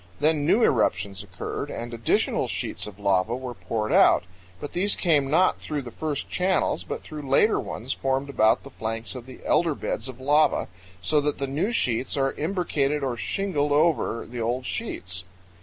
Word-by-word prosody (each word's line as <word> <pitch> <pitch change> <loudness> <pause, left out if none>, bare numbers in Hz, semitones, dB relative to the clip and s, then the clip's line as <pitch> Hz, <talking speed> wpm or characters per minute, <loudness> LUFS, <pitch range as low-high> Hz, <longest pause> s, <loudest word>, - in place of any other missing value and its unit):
Then 150 0 +2
new 225 +7 +4
eruptions 100 - +1
occurred 95 -3 -5
and 120 0 -5
additional 115 -1 +1
sheets 90 +3 -4
of 100 -2 -10
lava 100 +2 +1
were 130 -1 -5
poured 110 -2 -3
out; - - +6 0.4
but 145 - -7
these 200 +3 +3
came 150 -6 +2
not 180 +6 +3
through 150 -2 -4
the 120 - -8
first 150 +2 -3
channels, 185 +1 +1
but - - -5
through 155 -1 -7
later 210 +11 +4
ones 125 +4 -4
formed 135 +1 -1
about 110 -5 +3
the 140 - -11
flanks 115 -1 -4
of 125 -1 -8
the 130 - -11
elder 165 -4 +2
beds 120 0 -3
of 130 -1 -9
lava, 145 +3 +3 0.3
so 150 +11 +3
that 145 0 -1
the 140 - -1
new 155 - -1
sheets 130 - 0
are 135 -1 +1
imbricated 150 -4 0
or 130 -3 -1
shingled 150 +1 -1
over 150 -6 +2
the 120 +1 -5
old 120 +3 -1
sheets. 90 - -4
135 Hz, 180 wpm, -25 LUFS, 115-155 Hz, 0.4 s, out